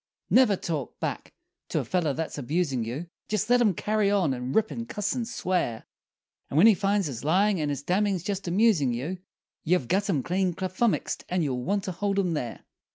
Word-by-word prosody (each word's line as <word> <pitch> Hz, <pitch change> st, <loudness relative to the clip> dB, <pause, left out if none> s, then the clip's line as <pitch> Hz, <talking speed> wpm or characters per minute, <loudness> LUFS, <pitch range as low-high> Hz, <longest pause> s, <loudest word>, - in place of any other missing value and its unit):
Never 245 Hz, -6 st, +6 dB
talk 155 Hz, -7 st, -4 dB
back -, -, -4 dB, 0.4 s
to -, -, -1 dB
a -, -, -3 dB
feller 175 Hz, -5 st, 0 dB
that's 155 Hz, +1 st, -4 dB
abusin' 140 Hz, -2 st, 0 dB
you 125 Hz, +9 st, -4 dB, 0.2 s
Jest 215 Hz, +2 st, 0 dB
let 245 Hz, 0 st, +5 dB
him 210 Hz, -6 st, +3 dB
carry 210 Hz, +1 st, +1 dB
on, 190 Hz, -9 st, +2 dB
and 125 Hz, +1 st, -4 dB
rip, 220 Hz, 0 st, +2 dB
and 235 Hz, 0 st, -5 dB
cuss 210 Hz, -4 st, -1 dB
and 240 Hz, -3 st, -3 dB
swear; 180 Hz, -, -1 dB, 0.6 s
And 140 Hz, -, -2 dB
when 165 Hz, -, +7 dB
he 225 Hz, -, +8 dB
finds 200 Hz, 0 st, +1 dB
his 130 Hz, -6 st, -5 dB
lyin' 190 Hz, +5 st, +3 dB
and 150 Hz, -1 st, -1 dB
his 140 Hz, -1 st, -3 dB
dammin's 190 Hz, +1 st, +1 dB
jest 195 Hz, -1 st, -3 dB
amusin' 175 Hz, -, +3 dB
you, 160 Hz, +10 st, -4 dB, 0.4 s
You've 165 Hz, -6 st, +1 dB
gut 200 Hz, -, +1 dB
him 145 Hz, -9 st, +1 dB
clean 185 Hz, -1 st, 0 dB
kaflummixed, 190 Hz, +5 st, -1 dB
and 180 Hz, -1 st, +1 dB
you 140 Hz, -4 st, -1 dB
want 190 Hz, +11 st, -1 dB
to 190 Hz, -, -3 dB
hold 200 Hz, +3 st, -1 dB
him 180 Hz, -4 st, +1 dB
there! 125 Hz, -6 st, -4 dB
185 Hz, 205 wpm, -27 LUFS, 150-205 Hz, 0.6 s, he